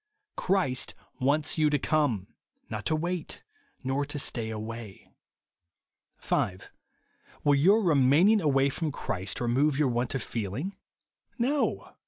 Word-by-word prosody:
Christ 160 -10 0 0.2
wants 145 +4 +1
you 155 -1 +4
to 145 - +2
come; 135 -10 0 0.4
not - - -3
to 155 - +2
wait, 175 +1 -3 0.4
nor 135 +2 0
to 145 +1 -5
stay 115 -5 -1
away. 110 -1 -7 1.0
5. 95 -1 -2 0.7
Will 145 - +4
your 195 +10 +5
remaining 160 +6 +5
aivay 140 -5 +2
froon 160 -3 -2
Christ 95 -8 -4
remove 130 +4 +2
your 145 -3 +3
want 120 +2 -1
of 130 - -2
feeling? 120 - -4 0.6
No. 275 +5 0
140 Hz, 125 wpm, -28 LUFS, 120-155 Hz, 1.0 s, your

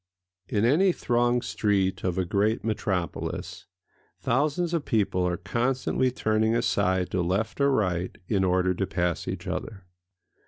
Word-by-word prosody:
In 105 +1 +1
any 175 +10 +4
thronged 120 -4 +1
street 95 -3 0
of 90 -1 -1
a 95 - +1
great 105 +5 +1
metropolis 95 -6 -3 0.5
thousands 155 +7 0
of 165 -3 0
people 100 -7 +1
are 90 0 -1
constantly 130 +3 0
turning 110 -2 +1
aside 95 -6 +1
to 90 - 0
left 100 +9 -1
or 140 - +4
right 90 -7 0
in 100 -4 +1
order 90 0 +2
to 95 +1 -2
pass 90 -3 -1
each - - -4
other. 95 -4 -5
105 Hz, 145 wpm, -26 LUFS, 95-120 Hz, 0.5 s, any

